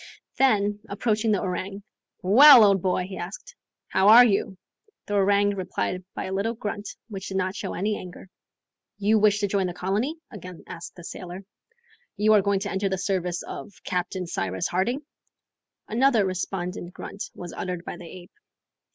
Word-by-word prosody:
Then, 205 -5 +2
approaching 215 +1 0
the 205 - +2
orang, 195 +1 -4 0.4
"Well, 250 +6 +9
old 195 -3 +4
boy!" 185 0 0
he 190 -1 -8
asked, 200 - -8 0.3
"how 190 +1 +2
are 235 +3 +10
you?" 195 -3 0 0.5
The 205 - -5
orang 205 0 +3
replied 185 -1 -3
by - - -3
a 190 - -4
little 215 +4 -1
grunt 205 -1 -5 0.2
which 195 -4 -7
did 190 - -3
not 185 +1 -1
show - - -5
any 210 +3 -1
anger. 180 +1 -10 0.7
"You 210 +2 +3
wish 205 -1 +4
to 205 - +1
join 195 -1 0
the 175 - -6
colony?" 205 - -1 0.2
again 185 -5 -10
asked 170 -1 -9
the 175 - -12
sailor. 180 +2 -8 0.7
"You 215 +1 +4
are 210 - +6
going 200 0 0
to 200 - -3
enter 195 +1 -1
the 190 - -1
service 180 -2 -2
of 205 - -8
Captain 180 +1 -2
Cyrus 95 - -2
Harding?" 240 +11 -1 0.8
Another 235 -2 +3
respondent 185 -1 -4
grunt 200 - -7
was 175 -1 -8
uttered 180 -1 -5
by - - -6
the 175 - -10
ape. 180 +1 -12
195 Hz, 170 wpm, -25 LUFS, 185-210 Hz, 0.8 s, are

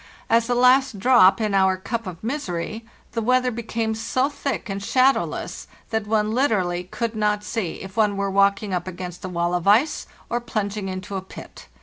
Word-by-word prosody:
As 230 +1 +3
a 245 - +2
last 255 -1 +4
drop 230 -2 +5
in 215 -2 -1
our 190 -1 +3
cup 230 +3 -4
of 180 0 -8
misery 220 - -3 0.3
the 230 - -2
weather 250 +2 +2
became 225 -1 -2
so 255 +5 0
thick 280 -3 -4
and 195 -1 -4
shadowless 260 +6 +1 0.2
that 220 -2 -1
one 215 0 +1
literally 190 -8 +1
could 230 +4 -4
not 210 -1 0
see 210 -7 -4
if 190 0 -10
one 210 -2 +2
were 200 0 -1
walking 200 0 +2
up 180 0 -2
against 180 -1 -7
a 185 - -4
wall 175 0 -1
of 180 +1 -1
ice 235 +10 +3 0.2
or 240 - -2
plunging 210 -4 -3
into 190 +2 -6
a - - -3
pit. 190 - -12
210 Hz, 190 wpm, -23 LUFS, 190-235 Hz, 0.3 s, drop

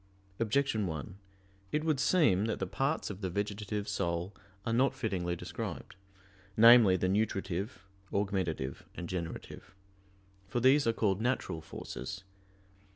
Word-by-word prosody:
Objection 115 -2 +1
1: 80 +4 -6 0.5
It 150 - 0
would 155 -4 +1
seem 130 - +4
that 110 - -1
the 95 - -2
parts 135 - -1
of 100 0 -9
the 95 - -1
vegetative 105 +2 -3
soul 85 +3 -2 0.3
are 115 - 0
not 130 +4 +3
fittingly 90 -6 -1
described 85 - -6 0.6
namely, 115 -4 +8
the 95 - 0
nutritive, 95 -1 -1 0.3
augmentative, 95 -9 -1
and 85 - -5
generative. 85 +1 -6 0.7
For 120 - -1
these 130 +2 +5
are - - +5
called 100 -3 +1
"natural" 110 -9 -1
forces. 95 +3 -7
100 Hz, 130 wpm, -32 LUFS, 90-115 Hz, 0.7 s, namely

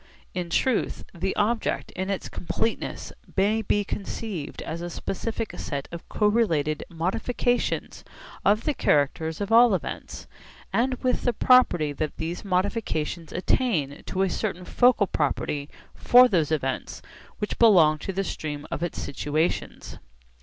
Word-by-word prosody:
In 180 -2 -3
truth 240 +7 0
the 190 +2 -2
object 220 +2 0
in 190 +1 -4
its 195 - -2
completeness 225 +5 -3 0.2
may 210 +3 +3
be 205 0 +1
conceived 200 -5 -5
as 165 +1 -5
a 175 - -4
specific 220 +5 -4
set 140 -2 -4
of 170 -1 -9
correlated 190 -9 +1
modifications 225 +8 -1 0.4
of 210 +3 +3
the 300 - +1
characters 160 - +1
of 205 +2 -3
all 230 -2 +7
events, - - -6 0.8
with 255 -1 +1
the 245 - +1
property 210 - +4
that 150 +1 -3
these 165 +2 -4
modifications 180 -5 -1
attain 160 - 0
to 190 0 0
a - - +2
certain 185 -4 -3
focal 245 0 +4
property 145 -3 -2 0.2
for 250 +1 +6
those 165 - +1
events 135 -4 -2 0.3
which 210 - -4
belong 170 -10 +6
to 195 - -4
the 195 +1 -1
stream 150 -5 -5
of - - -3
its 175 -2 -3
situations. 150 +4 -2
185 Hz, 135 wpm, -26 LUFS, 155-220 Hz, 0.8 s, all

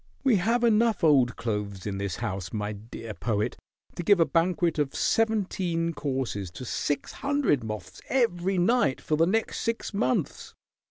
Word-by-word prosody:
"We 255 -6 +4
have 230 +6 +1
enough 225 -3 +3
old 135 -6 +4
clothes 105 -4 -3
in 100 -2 -3
this 100 -3 -2
house, 95 -2 -4
my 105 -1 -2
dear 110 +1 -8
Poet, 105 -1 -1 0.4
to - - -4
give 195 +2 +4
a 165 - +5
banquet 170 -1 +1
of 145 -2 -1
seventeen 185 -7 0
courses 130 - -3
to 130 - -7
six 145 +4 -2
hundred 280 - +1
moths 105 -4 -7
every 195 -7 +1
night 180 - +2
for 155 - -1
the 165 +2 +3
next 220 +4 0
six 230 -1 -2
months. 130 -10 -1
160 Hz, 160 wpm, -27 LUFS, -, 0.4 s, a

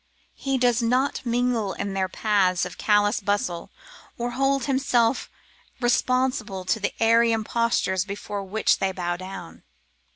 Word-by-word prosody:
He 270 -1 -2
does 245 -1 +2
not 255 +5 +1
mingle 235 -4 0
in 200 0 -4
their 190 -1 -1
paths 190 -4 +1
of 180 - -9
callous 205 0 +3
bustle, 200 -4 -2 0.5
or 240 +1 -2
hold 270 +1 +1
himself 260 -3 +1 0.5
responsible 240 -5 0
to 220 +4 +1
the 205 - -2
airy 230 +1 +4
impostures 225 -4 0
before 205 0 -5
which 205 +3 +1
they 195 0 0
bow 175 -2 -2
down. 185 +2 -9
220 Hz, 135 wpm, -24 LUFS, 195-245 Hz, 0.5 s, airy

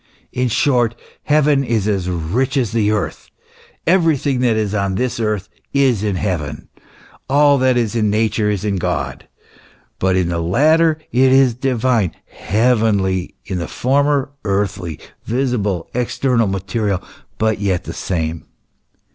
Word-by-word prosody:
* - - -38
In 125 - +2
short, 120 -1 +2 0.3
heaven 150 -2 +3
is 115 -5 0
as 95 -4 0
rich 100 - -1
as 120 -7 0
the 110 -3 +1
earth. 105 -2 -2 0.6
Everything 160 -6 +2
that 120 -3 +2
is 105 -2 -1
on 100 -2 0
this 125 +3 -1
earth, 105 -4 -1 0.3
is 135 -7 +2
in 105 -2 -1
heaven, 80 -7 -3
f - - -28 0.5
all 145 +1 +5
that 130 -1 +3
is 115 -2 0
in 110 -2 +2
Nature 105 0 +1
is 105 -1 -2
in 100 -2 0
God. 90 - -3 0.7
But 95 0 +2
in 90 -2 +1
the 85 -1 -1
latter 155 - +3
it 130 +2 +4
is 135 -2 +5
divine, 125 -5 0
heavenly; 105 -5 0
in 95 -2 -3
the 85 - -4
former, 140 +1 +1
earthly, 100 -5 -2 0.3
visible, 110 -8 -1
external, 125 -1 +1
material, 100 +1 -1 0.4
but 110 -1 0
yet 95 -4 0
the - - -6
same." 80 -3 -3
110 Hz, 145 wpm, -18 LUFS, 95-130 Hz, 0.7 s, all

